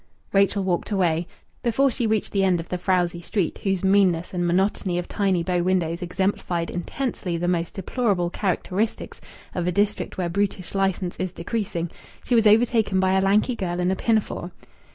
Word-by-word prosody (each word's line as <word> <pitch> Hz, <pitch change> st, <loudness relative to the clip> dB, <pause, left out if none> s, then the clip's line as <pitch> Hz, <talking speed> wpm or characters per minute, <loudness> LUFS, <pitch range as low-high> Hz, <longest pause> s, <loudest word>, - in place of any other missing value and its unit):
Rachel 200 Hz, 0 st, +3 dB
walked 180 Hz, -2 st, -1 dB
away. 175 Hz, -4 st, +1 dB, 0.3 s
Before 265 Hz, +3 st, +2 dB
she 240 Hz, -2 st, -1 dB
reached 215 Hz, -1 st, 0 dB
the 195 Hz, -1 st, +1 dB
end 185 Hz, -2 st, +3 dB
of 165 Hz, -, -7 dB
the 180 Hz, -, -2 dB
frowsy 175 Hz, -2 st, +1 dB
street, 175 Hz, -1 st, -2 dB
whose 195 Hz, -2 st, 0 dB
meanness 190 Hz, -3 st, +3 dB
and 175 Hz, -1 st, 0 dB
monotony 185 Hz, 0 st, +1 dB
of 175 Hz, -, -3 dB
tiny 190 Hz, -4 st, +1 dB
bow 180 Hz, 0 st, 0 dB
windows 175 Hz, -1 st, 0 dB
exemplified 180 Hz, -1 st, -1 dB
intensely 180 Hz, -1 st, -3 dB
the 175 Hz, +1 st, -2 dB
most 170 Hz, -1 st, -1 dB
deplorable 195 Hz, -3 st, 0 dB
characteristics 200 Hz, +3 st, -2 dB, 0.3 s
of 175 Hz, -1 st, -2 dB
a -, -, +2 dB
district 205 Hz, +3 st, 0 dB
where 180 Hz, -2 st, 0 dB
brutish 190 Hz, 0 st, -2 dB
licence 190 Hz, -2 st, 0 dB
is 185 Hz, -1 st, -2 dB
decreasing, 175 Hz, -2 st, -3 dB, 0.3 s
she -, -, -2 dB
was 225 Hz, -2 st, +5 dB
overtaken 220 Hz, -2 st, +3 dB
by 190 Hz, 0 st, +2 dB
a 190 Hz, -, +3 dB
lanky 210 Hz, +6 st, +2 dB
girl 180 Hz, -4 st, -3 dB
in 180 Hz, +1 st, +1 dB
a -, -, +1 dB
pinafore. 215 Hz, -5 st, 0 dB
185 Hz, 175 wpm, -24 LUFS, 175-205 Hz, 0.3 s, was